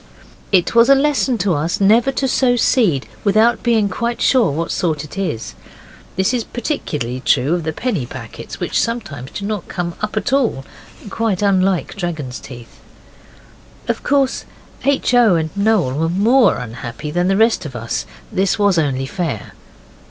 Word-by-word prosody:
It 180 -3 +3
was 235 +2 +5
a 275 - +8
lesson 275 -3 +1
to 195 -2 +1
us 155 +3 -1
never 225 +6 +4
to 270 - 0
sow 250 -1 +2
seed 210 - +2 0.2
without 220 +3 +3
being 225 -4 +2
quite 235 +5 -3
sure 245 -8 +3
what 165 +4 -2
sort 160 -5 -1
it 150 - -10
is. 180 - -3 0.6
This 190 +6 +1
is 240 -2 0
particularly 150 - -3
true 140 +2 +2
of 175 - 0
the 160 - -1
penny 185 - -2
packets, 115 -3 -9
which - - 0
sometimes 200 - -4
do 200 - -6
not 210 -3 -3
come 175 -2 -3
up 215 0 -3
at 225 - -1
all, 235 - +1 0.5
quite 215 -3 -1
unlike 190 -2 +1
dragon's 160 -9 -4
teeth. 120 -3 -12 1.1
Of - - -1
course 275 -2 +1 0.4
H. 275 -2 +1
O. 235 -6 +5
and 160 -1 -1
Noel 200 -9 +2
were 160 +4 0
more 225 +9 +4
unhappy 120 +3 -6
than 175 +3 0
the 195 0 +2
rest 225 +1 +3
of 145 -6 -8
us. 115 - -3 0.2
This 190 +2 +1
was 200 -4 +3
only 135 -3 0
fair. 145 - -4
190 Hz, 165 wpm, -18 LUFS, 150-230 Hz, 1.1 s, a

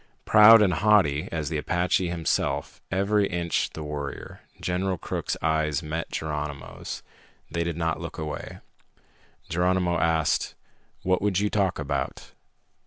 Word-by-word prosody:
Proud 110 0 +8
and 95 -3 +2
haughty 95 -7 +3
as 80 -3 -2
the 80 -2 -1
Apache 90 +3 +1
himself, 85 -2 -1
every 100 +1 +2
inch 85 -2 -1
the 80 - -7
warrior, 75 -1 -6 0.2
General 90 +1 -1
Crook's - - -3
eyes 80 -2 +1
met 80 +2 -4
Geronimo's. 75 -3 -5 0.5
They 85 0 -1
did 85 -1 -3
not 80 -1 -1
look 85 - -7
away. 75 -1 -6 0.9
Geronimo 90 0 +1
asked, 80 -2 +1 0.5
"What 90 0 +1
would 100 -2 +1
you 105 0 0
talk 95 -4 +1
about?" 70 -1 -3
85 Hz, 130 wpm, -26 LUFS, 75-95 Hz, 0.9 s, Proud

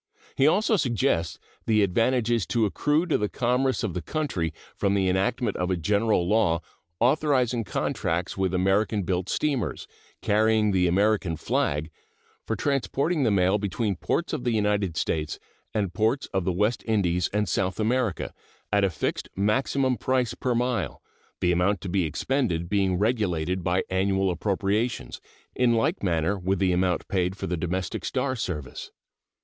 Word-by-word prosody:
He 135 - +3
also 210 +6 +3
suggests 105 - 0 0.3
the 110 -2 +4
advantages 115 +3 +1
to 115 -2 +2
accrue 150 - +1
to 165 - +1
the 105 -1 -1
commerce 125 +1 0
of 105 -6 -2
the 90 - -3
country 120 - -2 0.2
from 100 0 +1
the 95 -1 +2
enactment 105 +4 0
of 90 0 -1
a 90 - +1
general 100 +1 +1
law 90 -5 +2 0.4
authorizing 130 -2 +2
contracts 90 -3 -2
with 95 -2 0
American 95 +3 +1
built 90 +1 -2
steamers, 130 - -1 0.4
carrying 110 0 +3
the 90 -2 +2
American 100 -1 +2
flag, 75 +2 -1 0.6
for - - 0
transporting 140 +3 0
the 125 - +3
mail 95 0 +3
between 100 0 -1
ports - - -2
of - - -3
the - - +1
United 105 -5 0
States 75 -2 -1 0.3
and 100 -5 -1
ports 110 +8 +1
of 95 -2 0
the 95 - +1
West 105 +6 0
Indies 90 -5 +1
and 105 0 0
South 95 +2 -1
America, 115 -2 0 0.4
at 100 -1 +3
a 100 - +3
fixed 80 -4 -3
maximum 130 +5 +1
price 130 -3 0
per 125 0 -1
mile, 125 0 -1 0.4
the 90 - +3
amount 90 +3 +2
to 95 - -5
be 90 -1 +1
expended 85 - -1
being 95 -2 +1
regulated 95 -5 0
by 90 +2 +1
annual 95 0 +1
appropriations, 100 +6 -1 0.3
in 125 -2 +3
like 115 - 0
manner 90 +1 0
with 95 +2 0
the 95 -2 +2
amount 90 0 0
paid 95 0 -1
for - - -4
the 90 - -1
domestic 90 +2 -3
star 130 0 -1
service. 85 - -5
100 Hz, 160 wpm, -26 LUFS, 90-120 Hz, 0.6 s, the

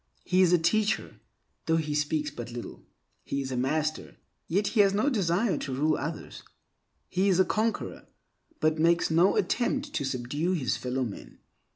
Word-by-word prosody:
He 185 0 +2
is 180 -2 +5
a 180 - +6
Teacher, 210 +6 0 0.5
though 160 0 +3
he 155 -2 -2
speaks 150 0 0
but 120 -2 -7
little. 120 0 -8 0.4
He 140 - -3
is 135 -1 -4
a - - -2
Master, 155 +5 -1 0.3
yet 200 +5 +1
he 225 - -1
has 200 -1 +5
no 260 +8 +2
desire 190 - +1
to 135 -2 -4
rule 155 +3 +2
others. 155 +2 -6 0.7
He 190 +2 +1
is 185 -1 +3
a 190 - +6
Conqueror, 220 +1 -2 0.5
but 155 0 +1
makes 170 +1 +3
no 170 +4 +4
attempt 260 +8 0
to - - -1
subdue 135 +7 -1
his 135 -10 0
fellow 130 +1 -2
men. 110 -5 -8
160 Hz, 175 wpm, -28 LUFS, 140-190 Hz, 0.7 s, a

